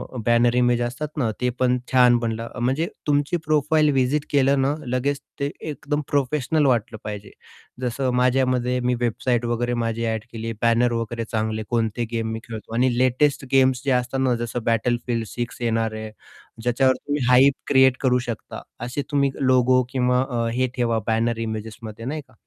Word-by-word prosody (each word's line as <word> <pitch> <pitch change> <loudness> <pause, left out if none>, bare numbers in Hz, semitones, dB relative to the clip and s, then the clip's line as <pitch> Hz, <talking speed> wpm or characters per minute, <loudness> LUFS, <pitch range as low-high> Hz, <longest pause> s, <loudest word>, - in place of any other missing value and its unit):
अ, - - -4
banner 120 +1 +3
image 120 -1 +3
असतात 125 +5 -3
ना, 120 -6 +1
ते 125 - +2
पण 125 0 +3
छान 125 -2 +6
बनलं. 115 0 -3
म्हणजे 135 +7 +1 0.2
तुमची 145 +4 +1
प्रोफाइल 155 0 +3
व्हीजीट 135 +3 +1
केलं 140 -1 +3
ना, 135 +2 +2
लगेच 130 +3 -1 0.2
ते 140 +1 -1 0.2
एकदम 145 +1 -3
प्रोफेशनल 145 +2 +1
वाटलं 115 -3 +1
पाहिजे. 105 -1 -7 0.5
जसं 125 +1 -1
माझ्यामध्ये 125 -1 +2
मी 125 0 0
वेबसाईट 120 +1 0
वगैरे, 120 +1 -1
माझी 115 0 -2
ॲड 110 -1 -2
केली, 115 0 -5
बॅनर 120 +1 +3
वगैरे 115 0 -3
चांगले. 110 0 -1
कोणते 115 0 0
गेम 115 -1 -2
मी 110 - -4
खेळतो, 110 0 -8
आणि 125 0 +2
लेटेस्ट 135 +2 +2
गेम्स 130 -1 +4
जे 135 - +2
असतात 125 +2 -4
ना, 130 -2 +2
जसं 120 +1 -3
Battlefield 115 0 0
6 120 +1 -5
येणार 115 -1 0
आहे. 110 0 -6 0.5
ज्याच्यावर 130 +2 +2
तुम्ही 145 0 -3
हाइप 130 +2 +6
क्रिएट 130 -2 +5
करू 125 -2 +3
शकता, 115 - -6 0.2
असे 130 +4 -3
तुम्ही 140 -2 +2 0.2
लोगो 130 0 +4
किंवा 125 -1 +1
अ, 120 -2 -1
हे 130 +1 +1
ठेवा 115 -3 +1
बॅनर 115 +1 +1
इमेजेसमध्ये 110 +1 -7
नाही 150 +4 -3
का? - - -24
125 Hz, 170 wpm, -23 LUFS, 115-130 Hz, 0.5 s, छान